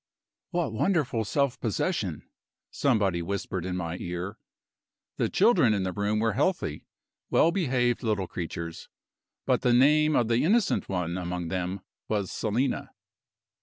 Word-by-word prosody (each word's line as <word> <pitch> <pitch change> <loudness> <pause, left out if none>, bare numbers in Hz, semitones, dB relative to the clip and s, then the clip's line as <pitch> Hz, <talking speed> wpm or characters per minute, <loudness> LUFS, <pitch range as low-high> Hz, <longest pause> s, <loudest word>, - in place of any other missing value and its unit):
"What 175 -9 -1
wonderful 140 - +1
self 140 +4 0
possession!" 110 - -1 0.5
somebody 100 -10 +1
whispered 95 0 -3
in 90 0 -2
my 85 -1 -3
ear. 90 +4 -5 0.8
The - - +1
children 180 - +4
in 100 - -1
the 95 - -1
room 105 +3 0
were 110 -1 +1
healthy, 140 - -1 0.4
well 165 - +4
behaved 125 -9 +1
little 105 -5 0
creatures 85 -1 -6 0.6
but - - +2
the 125 - +3
name 150 +4 +5
of 120 - +3
the 115 +1 +2
innocent 210 +6 +2
one 90 -1 -2
among 90 -1 -3
them 90 +2 -3 0.3
was 100 -3 -1
Selina. 120 +5 -1
110 Hz, 135 wpm, -27 LUFS, 90-140 Hz, 0.8 s, name